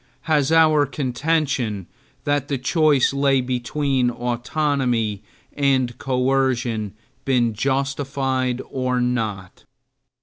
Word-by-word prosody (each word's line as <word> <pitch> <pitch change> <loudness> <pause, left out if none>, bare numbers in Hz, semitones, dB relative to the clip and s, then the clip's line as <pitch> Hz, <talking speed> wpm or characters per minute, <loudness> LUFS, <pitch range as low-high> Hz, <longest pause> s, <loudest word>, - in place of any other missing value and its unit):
Has 150 -2 +1
our 155 -3 +5
contention 130 - -1 0.4
that 145 -2 0
the 140 - -1
choice 145 0 +2
lay 140 -1 +2
between 130 +1 0
autonomy 120 -3 -1 0.3
and 130 -4 +1
coercion 125 -5 0 0.3
been 120 -4 +1
justified 135 0 -1
or 130 -1 -1
not? 110 -7 -3
130 Hz, 90 wpm, -22 LUFS, 120-140 Hz, 0.4 s, our